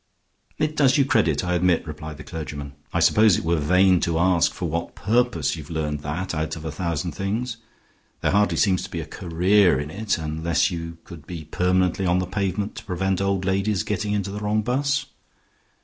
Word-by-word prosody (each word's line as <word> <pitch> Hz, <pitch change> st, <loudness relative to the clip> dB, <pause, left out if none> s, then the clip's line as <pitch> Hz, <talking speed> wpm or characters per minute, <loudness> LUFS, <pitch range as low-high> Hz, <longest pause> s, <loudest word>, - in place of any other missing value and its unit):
"It 155 Hz, 0 st, -1 dB
does 140 Hz, -1 st, +4 dB
you 140 Hz, -, +4 dB
credit, 85 Hz, -, +2 dB
I 90 Hz, -, 0 dB
admit," 90 Hz, -1 st, +2 dB
replied 75 Hz, -1 st, -7 dB
the 75 Hz, -, -9 dB
clergyman. 75 Hz, -3 st, -6 dB, 0.2 s
"I -, -, 0 dB
suppose 105 Hz, -4 st, +5 dB
it -, -, -4 dB
were 85 Hz, 0 st, +2 dB
vain 90 Hz, +4 st, +4 dB
to 85 Hz, -1 st, 0 dB
ask 90 Hz, -1 st, +3 dB
for 90 Hz, -, -4 dB
what 85 Hz, +2 st, -3 dB
purpose 120 Hz, +1 st, +1 dB
you 80 Hz, -, -7 dB
have 70 Hz, -, -13 dB
learned 75 Hz, -2 st, -2 dB
that 75 Hz, +7 st, -4 dB
out 80 Hz, +1 st, -2 dB
of 80 Hz, -1 st, -9 dB
a 80 Hz, -, -3 dB
thousand 85 Hz, 0 st, -2 dB
things. 110 Hz, -, -3 dB, 0.6 s
There -, -, +1 dB
hardly 105 Hz, +1 st, +2 dB
seems 95 Hz, -4 st, +3 dB
to -, -, -7 dB
be -, -, -4 dB
a -, -, -4 dB
career 90 Hz, -2 st, +2 dB
in 75 Hz, +1 st, -5 dB
it, 105 Hz, +3 st, -1 dB
unless 80 Hz, +3 st, 0 dB
you 85 Hz, -1 st, -5 dB
could 80 Hz, -4 st, -12 dB
be 85 Hz, -3 st, -6 dB
permanently 90 Hz, +3 st, +1 dB
on 90 Hz, +1 st, +3 dB
the 90 Hz, -, 0 dB
pavement 100 Hz, +2 st, -2 dB
to -, -, -7 dB
prevent 95 Hz, 0 st, -1 dB
old 100 Hz, -1 st, 0 dB
ladies 95 Hz, 0 st, +1 dB
getting 105 Hz, 0 st, -2 dB
into 100 Hz, -1 st, -1 dB
the 105 Hz, -, -5 dB
wrong 105 Hz, +1 st, 0 dB
bus. 140 Hz, +5 st, 0 dB
90 Hz, 205 wpm, -24 LUFS, 80-105 Hz, 0.6 s, suppose